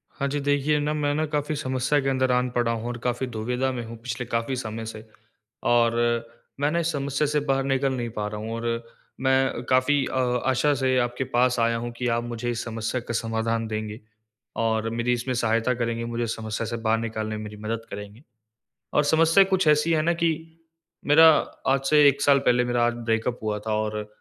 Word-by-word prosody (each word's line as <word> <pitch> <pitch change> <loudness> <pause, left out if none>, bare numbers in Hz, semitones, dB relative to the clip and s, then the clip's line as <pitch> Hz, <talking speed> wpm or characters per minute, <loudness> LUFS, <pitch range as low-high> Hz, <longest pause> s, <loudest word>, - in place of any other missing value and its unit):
हाँ, 140 - -1
जी। 145 +1 -2
देखिए 145 +1 +1
ना, 150 +1 -1
मैं 145 -1 0
ना 155 +1 +1
काफ़ी 150 0 -2
समस्या 130 +1 0
के 135 - 0
अंदर 130 -1 +1
आन 125 0 +2
पड़ा 120 -1 0
हूँ 115 0 -3
और 120 0 -4
काफ़ी 125 +1 -1
दुविधा 125 +3 -2
में 120 -2 -4
हूँ 115 +1 -9
पिछले 125 0 -4
काफ़ी 115 +2 -2
समय 115 -2 -5
से। 110 0 -8 0.6
और 120 -1 +4 0.7
मैं 145 +1 +1
ना 170 - +1
इस 170 0 0
समस्या 140 0 -1
से 150 +1 +1
बाहर 135 0 +2
निकल 135 0 +1
नहीं 120 -2 -3
पा 105 -1 -1
रहा 105 0 -5
हूँ। 110 +1 -5
और 115 0 -2 0.4
मैं 130 -2 +2
काफ़ी 130 +2 +3
अ, - - -6 0.3
आशा 135 +3 +2
से 130 -1 +1
आपके 120 +1 -1
पास 125 0 +3
आया 115 0 +2
हूँ 120 +1 -4
कि 125 - -2
आप 120 - -2
मुझे 120 0 -4
इस 120 - -3
समस्या 115 +2 -3
का 120 - -6
समाधान 115 0 -1
देंगे 110 0 -4 0.7
और 110 0 0
मेरी 115 +2 0
इसमें 125 +2 -2
सहायता 115 +1 +1
करेंगे, 115 -1 -2
मुझे 120 0 -2
इस 115 - -2
समस्या 110 0 -4
से 115 +1 -3
बाहर 110 0 +2
निकालने 110 -1 -3
में 105 - -6
मेरी 105 0 -8
मदद 115 +1 -3
करेंगे। 105 +5 -9 0.7
और 150 - +4
समस्या 165 +5 +5
कुछ 190 -3 +1
ऐसी 150 +2 +4
है 155 - +3
ना 170 +2 +2
कि 170 -1 +1 0.8
मेरा 160 +3 +8 0.4
आज 135 0 +3
से 150 -1 +6
1 140 0 -2
साल 140 -1 +5
पहले 125 -2 +3
मेरा 120 -1 +1
आज 120 - +1
ब्रेकअप 115 +1 -1
हुआ 105 -1 -1
था 110 - 0
और 105 -1 -3
120 Hz, 215 wpm, -25 LUFS, 115-140 Hz, 0.8 s, मेरा